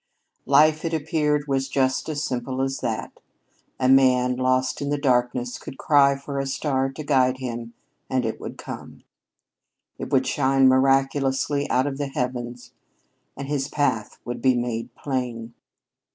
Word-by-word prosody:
Life, 155 Hz, +3 st, +5 dB
it 165 Hz, -1 st, -1 dB
appeared, 150 Hz, -1 st, 0 dB
was 135 Hz, -1 st, 0 dB
just 130 Hz, +2 st, 0 dB
as 150 Hz, -1 st, -2 dB
simple 130 Hz, 0 st, -2 dB
as 135 Hz, 0 st, -2 dB
that. -, -, -4 dB, 0.6 s
A 130 Hz, -, +2 dB
man, 130 Hz, -1 st, +4 dB
lost 130 Hz, +1 st, 0 dB
in 140 Hz, -, -2 dB
the 145 Hz, -, 0 dB
darkness, 125 Hz, -2 st, 0 dB
could 135 Hz, -, -9 dB
cry 140 Hz, -2 st, +4 dB
for 140 Hz, 0 st, -5 dB
a 135 Hz, -, -2 dB
star 135 Hz, -1 st, 0 dB
to 155 Hz, -, -7 dB
guide 130 Hz, -3 st, +2 dB
him, 120 Hz, -2 st, -6 dB, 0.3 s
and 130 Hz, -1 st, 0 dB
it 110 Hz, -, -4 dB
would -, -, -7 dB
come. -, -, -9 dB, 1.0 s
It -, -, -6 dB
would -, -, +3 dB
shine 135 Hz, -1 st, +3 dB
miraculously 135 Hz, +1 st, +2 dB
out 130 Hz, +1 st, +2 dB
of 140 Hz, -1 st, -3 dB
the 145 Hz, -, -1 dB
heavens, 125 Hz, -1 st, -4 dB, 0.7 s
and 140 Hz, -, -5 dB
his 140 Hz, -1 st, -1 dB
path 115 Hz, -9 st, -1 dB
would 120 Hz, -, -5 dB
be 130 Hz, -1 st, +4 dB
made 120 Hz, -1 st, -2 dB
plain. 120 Hz, -4 st, -4 dB
135 Hz, 155 wpm, -24 LUFS, 125-140 Hz, 1.0 s, Life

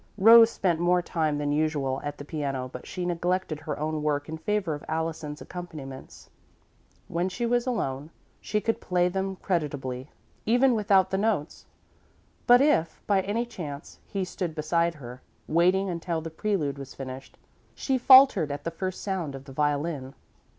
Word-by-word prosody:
Rose 225 Hz, +3 st, +8 dB
spent 175 Hz, -7 st, 0 dB
more 175 Hz, +1 st, +2 dB
time 155 Hz, -4 st, -1 dB
than 145 Hz, 0 st, -1 dB
usual 145 Hz, -3 st, 0 dB
at 145 Hz, 0 st, -5 dB
the 145 Hz, -, -8 dB
piano 140 Hz, -4 st, -3 dB
but 125 Hz, 0 st, -10 dB
she 180 Hz, -, -4 dB
neglected 175 Hz, -2 st, -1 dB
her 155 Hz, 0 st, -5 dB
own 155 Hz, +1 st, -2 dB
work 145 Hz, -1 st, -1 dB
in 160 Hz, -, -5 dB
favour 190 Hz, 0 st, -1 dB
of 145 Hz, -, -7 dB
Allison's 160 Hz, -2 st, -3 dB
accompaniments. 155 Hz, -7 st, -9 dB, 0.8 s
When 175 Hz, +2 st, -1 dB
she 235 Hz, +6 st, -3 dB
was 240 Hz, +1 st, +1 dB
alone, 150 Hz, -, -2 dB, 0.3 s
she 210 Hz, -, -1 dB
could 225 Hz, +1 st, -1 dB
play 180 Hz, -1 st, +1 dB
them 190 Hz, +1 st, -2 dB
creditably, 145 Hz, -8 st, -3 dB, 0.3 s
even 245 Hz, +3 st, +4 dB
without 200 Hz, -4 st, +3 dB
the 190 Hz, -, 0 dB
notes, 200 Hz, -8 st, -1 dB, 0.8 s
but 245 Hz, +1 st, +7 dB
if, 170 Hz, -, +2 dB
by 200 Hz, -2 st, +3 dB
any 210 Hz, +5 st, -1 dB
chance, 155 Hz, -10 st, -8 dB
he 195 Hz, -2 st, -2 dB
stood 180 Hz, -3 st, -4 dB
beside 170 Hz, +2 st, +1 dB
her, 125 Hz, -3 st, -10 dB, 0.3 s
waiting 180 Hz, +4 st, +3 dB
until 170 Hz, -2 st, -2 dB
the 160 Hz, 0 st, -7 dB
prelude 160 Hz, -7 st, -1 dB
was 135 Hz, -1 st, -9 dB
finished, 130 Hz, 0 st, -8 dB, 0.4 s
she 265 Hz, -2 st, 0 dB
faltered 260 Hz, -, +7 dB
at 145 Hz, -, -5 dB
the 165 Hz, -, -3 dB
first 185 Hz, +2 st, -4 dB
sound 180 Hz, -8 st, -3 dB
of 135 Hz, 0 st, -10 dB
the 135 Hz, -, -11 dB
violin. 145 Hz, -1 st, -1 dB
165 Hz, 165 wpm, -27 LUFS, 145-190 Hz, 0.8 s, Rose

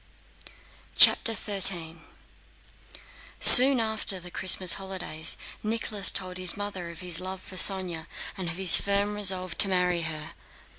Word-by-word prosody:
CHAPTER 225 Hz, -, +4 dB
XIII 185 Hz, -5 st, +1 dB, 1.4 s
Soon 260 Hz, 0 st, +8 dB
after 220 Hz, -4 st, -4 dB
the 175 Hz, 0 st, -14 dB
Christmas 185 Hz, -1 st, +2 dB
holidays 190 Hz, -5 st, -6 dB, 0.2 s
Nicholas 215 Hz, -2 st, 0 dB
told 185 Hz, -2 st, -5 dB
his 185 Hz, 0 st, -3 dB
mother 200 Hz, -4 st, -9 dB
of 170 Hz, 0 st, -13 dB
his 180 Hz, -2 st, -1 dB
love 185 Hz, +1 st, -8 dB
for 185 Hz, -, -13 dB
Sónya 185 Hz, -4 st, -2 dB, 0.3 s
and 185 Hz, -4 st, -7 dB
of 160 Hz, -, -9 dB
his 190 Hz, -2 st, +3 dB
firm 200 Hz, +1 st, -4 dB
resolve 185 Hz, -3 st, -4 dB
to 195 Hz, -, +5 dB
marry 180 Hz, -2 st, -2 dB
her. 155 Hz, -1 st, -9 dB
185 Hz, 135 wpm, -24 LUFS, 175-200 Hz, 1.4 s, Soon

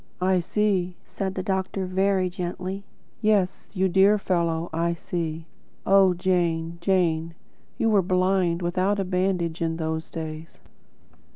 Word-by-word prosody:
"I 185 Hz, 0 st, +2 dB
see," 185 Hz, -1 st, 0 dB
said 190 Hz, -1 st, -4 dB
the 185 Hz, -, -3 dB
doctor, 190 Hz, 0 st, -1 dB
very 190 Hz, 0 st, +1 dB
gently. 185 Hz, +1 st, -5 dB, 0.4 s
"Yes, 210 Hz, -4 st, +1 dB
you 190 Hz, 0 st, +2 dB
dear 195 Hz, +3 st, +5 dB
fellow, 170 Hz, -4 st, 0 dB
I 170 Hz, +1 st, 0 dB
see." 165 Hz, -2 st, -4 dB, 0.4 s
(Oh, 195 Hz, -2 st, +5 dB
Jane, 170 Hz, -2 st, 0 dB
Jane! 170 Hz, -3 st, +1 dB, 0.4 s
You 225 Hz, -, +1 dB
were 205 Hz, -2 st, +5 dB
blind, 185 Hz, -1 st, +1 dB
without 185 Hz, +4 st, +1 dB
a -, -, +1 dB
bandage, 180 Hz, -2 st, -1 dB
in 165 Hz, -1 st, -1 dB
those 160 Hz, 0 st, -3 dB
days!) 160 Hz, 0 st, -7 dB
180 Hz, 130 wpm, -25 LUFS, 170-190 Hz, 0.4 s, dear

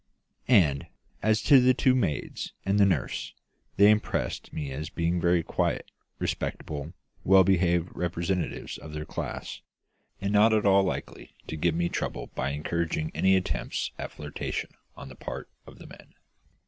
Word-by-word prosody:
And, 80 Hz, -, +4 dB, 0.3 s
as 110 Hz, 0 st, +2 dB
to 140 Hz, -3 st, +7 dB
the 125 Hz, 0 st, +4 dB
two 130 Hz, -, +3 dB
maids 95 Hz, -, -2 dB
and 100 Hz, +1 st, +2 dB
the 100 Hz, -, +6 dB
nurse, 85 Hz, -9 st, -2 dB, 0.4 s
they 100 Hz, +1 st, +8 dB
impressed 105 Hz, 0 st, -1 dB
me 75 Hz, -3 st, -4 dB
as 75 Hz, +5 st, -5 dB
being 85 Hz, 0 st, -1 dB
very 85 Hz, -1 st, +3 dB
quiet, -, -, -1 dB, 0.3 s
respectable 75 Hz, +2 st, -4 dB, 0.3 s
well 95 Hz, 0 st, +7 dB
behaved 90 Hz, -2 st, +2 dB
representatives 90 Hz, +1 st, -2 dB
of 75 Hz, -, -10 dB
their 75 Hz, 0 st, -4 dB
class, -, -, -5 dB, 0.6 s
and 100 Hz, +1 st, -2 dB
not 110 Hz, +2 st, +5 dB
at 110 Hz, -1 st, +2 dB
all 100 Hz, 0 st, +6 dB
likely 95 Hz, -, -4 dB
to -, -, -5 dB
give 80 Hz, +1 st, +1 dB
me 85 Hz, +1 st, +1 dB
trouble -, -, -4 dB
by 65 Hz, -, -1 dB
encouraging 80 Hz, +2 st, -2 dB
any 95 Hz, 0 st, +4 dB
attempts 95 Hz, -, -2 dB
at -, -, -5 dB
flirtation 75 Hz, -1 st, -5 dB, 0.2 s
on -, -, -9 dB
the 65 Hz, -, -11 dB
part -, -, -7 dB, 0.2 s
of -, -, -13 dB
the -, -, -12 dB
men. -, -, -15 dB
90 Hz, 160 wpm, -27 LUFS, 80-100 Hz, 0.6 s, they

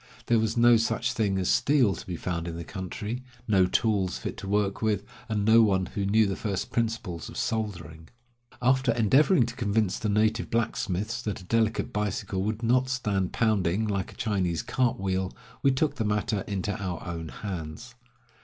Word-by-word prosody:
There 115 Hz, -1 st, +3 dB
was 110 Hz, +1 st, -1 dB
no 120 Hz, 0 st, +7 dB
such 120 Hz, +3 st, 0 dB
thing 105 Hz, -6 st, 0 dB
as 95 Hz, -1 st, 0 dB
steel 135 Hz, -8 st, +3 dB
to -, -, -9 dB
be 90 Hz, -, -3 dB
found 85 Hz, 0 st, -3 dB
in 85 Hz, -, -4 dB
the 85 Hz, -, -5 dB
country, 105 Hz, +6 st, -5 dB, 0.3 s
no 95 Hz, -4 st, +4 dB
tools 100 Hz, -4 st, +1 dB
fit -, -, -5 dB
to 100 Hz, -, -7 dB
work 100 Hz, -1 st, 0 dB
with, 105 Hz, -3 st, +1 dB, 0.3 s
and 105 Hz, -2 st, 0 dB
no 115 Hz, +1 st, +7 dB
one 95 Hz, -4 st, +3 dB
who 100 Hz, +2 st, -3 dB
knew 110 Hz, +2 st, +4 dB
the 100 Hz, -1 st, -1 dB
first 100 Hz, -2 st, -3 dB
principles 110 Hz, -8 st, -2 dB
of -, -, -9 dB
soldering. 95 Hz, -7 st, -3 dB, 0.5 s
After 130 Hz, 0 st, +3 dB
endeavoring 125 Hz, -, +4 dB
to 120 Hz, +1 st, -7 dB
convince 105 Hz, -4 st, 0 dB
the 110 Hz, -4 st, -1 dB
native 110 Hz, +2 st, +1 dB
blacksmiths 110 Hz, -1 st, -1 dB
that 105 Hz, -4 st, -4 dB
a -, -, -12 dB
delicate 110 Hz, +3 st, 0 dB
bicycle 100 Hz, -2 st, -2 dB
would 110 Hz, +3 st, -2 dB
not 125 Hz, +3 st, +3 dB
stand 105 Hz, -8 st, -1 dB
pounding 110 Hz, -2 st, +1 dB
like 100 Hz, -3 st, -2 dB
a -, -, -15 dB
Chinese 95 Hz, -7 st, -1 dB
cart 125 Hz, -5 st, 0 dB
wheel, 95 Hz, -1 st, -1 dB, 0.3 s
we 140 Hz, -, +4 dB
took 135 Hz, +3 st, 0 dB
the 115 Hz, -, 0 dB
matter 105 Hz, -1 st, 0 dB
into 100 Hz, 0 st, -2 dB
our 90 Hz, -3 st, -4 dB
own 85 Hz, -2 st, -5 dB
hands. 90 Hz, +5 st, -6 dB
105 Hz, 185 wpm, -27 LUFS, 95-115 Hz, 0.5 s, no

